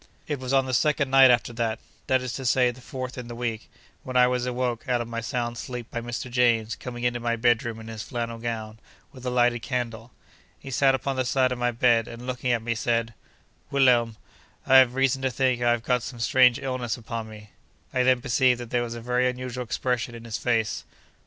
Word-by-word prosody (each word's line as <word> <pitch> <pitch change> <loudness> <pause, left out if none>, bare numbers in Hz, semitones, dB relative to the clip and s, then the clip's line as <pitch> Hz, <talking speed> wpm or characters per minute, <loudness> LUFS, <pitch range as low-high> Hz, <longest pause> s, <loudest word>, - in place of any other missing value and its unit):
It 145 -3 -3
was 130 0 -4
on 135 -1 +3
the 130 - -4
second 145 +1 +1
night 135 -1 +8
after 120 -1 +2
that—that 115 +3 -2
is 125 -2 -4
to 135 - -5
say, 125 0 +3
the 125 +1 -14
fourth 130 0 -6
in 120 - -7
the 120 - -7
week—when 120 +2 -6
I 125 - +7
was 125 0 0
awoke 125 -1 -2
out 125 -1 +2
of 120 - -4
my 115 0 -4
sound 120 0 -3
sleep 125 -2 -7
by 120 - -3
Mr. 120 +2 -5
James 120 -3 +2
coming 120 -1 -7
into 120 0 0
my 120 0 0
bedroom 115 -1 +1
in 110 - -10
his 110 -1 -6
flannel 115 -1 -4
gown, 110 -2 -5 0.3
with 130 -1 -9
a - - +2
lighted 120 -1 +2
candle. 120 -2 -4 0.5
He 135 - -10
sat 135 +1 +4
upon 135 0 -3
the 130 - +2
side 130 +1 +2
of 125 - -3
my 120 0 +1
bed, 115 -1 +2
and 120 +1 -9
looking 125 0 -2
at 115 -2 0
me, 115 0 0
said: 115 0 -1 0.6
'Wilhelm, 120 -5 +3 0.5
I 135 - +7
have 130 -1 +5
reason 135 0 +1
to 135 - +1
think 130 0 0
I 120 - +3
have 120 -1 +1
got 125 0 +1
some 120 0 -7
strange 125 +1 +4
illness 130 -4 -3
upon 115 -1 -6
me.' 105 -1 -12 0.4
I 125 - +2
then 125 -1 +3
perceived 125 0 +2
that 120 -2 -8
there 120 - +1
was 120 -1 -4
a 115 - -7
very 125 +2 +1
unusual 125 0 -5
expression 120 +1 -2
in 115 0 -10
his 115 0 -4
face. 115 -3 0
120 Hz, 225 wpm, -25 LUFS, 115-130 Hz, 0.6 s, night